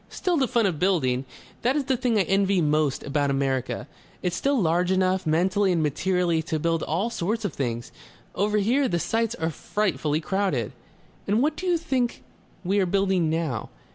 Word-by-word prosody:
"Still 360 -3 -1
the 270 -5 +2
fun 235 -3 +2
of 175 -6 0
building. 135 -9 +1 0.4
That 250 +3 +2
is 295 - +1
the 265 0 +1
thing 245 -2 +1
I - - +4
envy 195 +1 +2
most 150 -3 +1
about 145 0 0
America. 135 -2 -1 0.4
It's 180 -1 0
still 275 -1 +1
large 175 0 +2
enough, 185 -1 +1
mentally 185 +5 +2
and 165 -3 +1
materially, 170 +2 +1
to 160 0 -2
build 165 +1 0
all 190 +9 -1
sorts 220 +2 -2
of 185 - -2
things.... 120 -3 -3 0.4
Over 210 +2 +1
here, 250 +7 +2
the 175 - 0
sites 225 +5 0
are 160 -4 -2
frightfully 155 -5 -1
crowded...." 165 - -1 0.6
"And 210 +3 +2
what 300 +4 +1
do 370 +3 -5
you 350 -1 +3
think 265 -7 -1 0.4
we 195 +3 +1
are 190 - +2
building 190 -3 +1
now? 155 -8 -2
185 Hz, 185 wpm, -25 LUFS, 155-220 Hz, 0.6 s, I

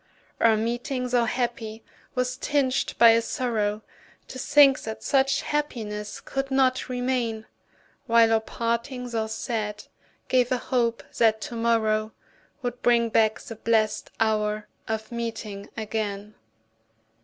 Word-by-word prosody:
Our 225 -1 +5
meeting, 240 +3 -2
tho' 240 -1 +3
happy, 230 -2 -3 0.3
was 250 0 0
tinged 275 -1 0
by 235 - +8
a 230 +1 +4
sorrow 215 -3 -1 0.5
To 260 - -7
think 275 0 +5
that 220 0 -6
such 275 0 +2
happiness 215 -8 -3
could 270 0 -4
not 260 -1 +2
remain; 245 -3 -1 0.6
While 230 -1 +5
our 225 - +4
parting, 235 +3 -3
tho' 220 -1 -1
sad, 220 -2 -3 0.4
gave 250 -1 +2
a 255 - +3
hope 235 -2 0 0.2
that 220 -1 +4
to 235 - -6
morrow 220 -2 +1 0.5
Would 245 0 -4
bring 235 -1 +3
back 220 0 +3
the 225 - -8
blest 220 -1 +1
hour 215 -1 0 0.2
of 220 0 -3
meeting 225 -4 -5
again. 210 -1 -3
230 Hz, 130 wpm, -25 LUFS, 220-250 Hz, 0.6 s, by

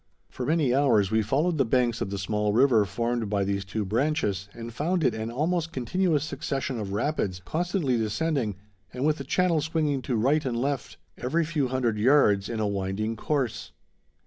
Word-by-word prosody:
For 125 - -5
many 155 -5 +2
hours 120 -8 +3
we 110 0 +3
followed 150 - 0
the - - +5
banks 120 -1 +1
of - - -1
the 100 - -3
small 105 +2 -1
river 120 -3 +4
formed 115 +2 -2
by 100 -1 +1
these 100 0 -1
two 100 +3 -3
branches, 105 - 0
and 115 +1 -8
found 165 +7 0
it 125 -5 +3
an 110 0 -4
almost 165 +6 -1
continuous 155 +3 0
succession 135 -4 -3
of 100 -2 -4
rapids, 100 -4 -1
constantly 170 -6 0
descending, 115 - -1 0.4
and 125 +3 -3
with 155 -1 +2
a - - -4
channel 170 +3 +2
swinging 155 -3 0
to 125 0 -2
right 140 +8 +2
and 125 -4 -2
left, 135 0 -2 0.2
every 155 +7 0
few 150 -4 0
hundred 125 -4 0
yards, 105 -5 +4
in 115 -2 -3
a 110 - +1
winding 100 +2 -2
course. 130 -1 -2
125 Hz, 185 wpm, -26 LUFS, 110-150 Hz, 0.4 s, the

